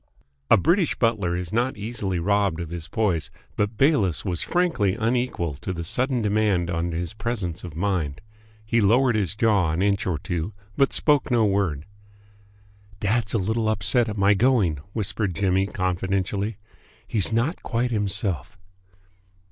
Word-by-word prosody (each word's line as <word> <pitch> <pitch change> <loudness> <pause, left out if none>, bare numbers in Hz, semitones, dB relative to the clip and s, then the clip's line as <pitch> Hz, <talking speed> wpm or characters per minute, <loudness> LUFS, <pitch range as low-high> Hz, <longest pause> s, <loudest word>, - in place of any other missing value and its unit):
A 115 - +7
British 170 - +2
butler 105 -7 +1
is 90 +1 -5
not 120 +2 0
easily 105 -3 -2
robbed 100 -1 +1
of 85 -2 -5
his 85 -2 -5
poise, 100 -9 0 0.3
but 105 +1 -1
Bayliss 110 - +2
was 90 -4 -2
frankly 130 - +1
unequal 115 - -1
to 75 +7 -6
the 85 -1 -5
sudden 125 - 0
demand 100 -5 +1
on 85 0 -1
his 85 +3 -3
presence 105 -6 -3
of 85 -4 -8
mind. 85 -6 -1 0.5
He 115 +2 +2
lowered 120 +4 +4
his 100 -3 0
jaw 105 -6 +2
an 80 +4 0
inch 100 0 +1
or 90 -4 0
two, 85 +5 -4 0.2
but 135 - +3
spoke 145 -3 +2
no 120 -3 +3
word. 95 -7 0 1.1
"Dad's 105 +1 0
a - - +4
little 110 +3 0
upset 115 +2 +2
at 105 - -5
my 100 +1 +4
going," 105 - +2 0.2
whispered 105 -3 -1
Jimmy 95 0 +1
confidentially. 95 +2 -2 0.5
"He's 110 -2 +2
not 120 +10 0
quite 120 +1 -1
himself." 100 - -1
100 Hz, 155 wpm, -24 LUFS, 90-115 Hz, 1.1 s, A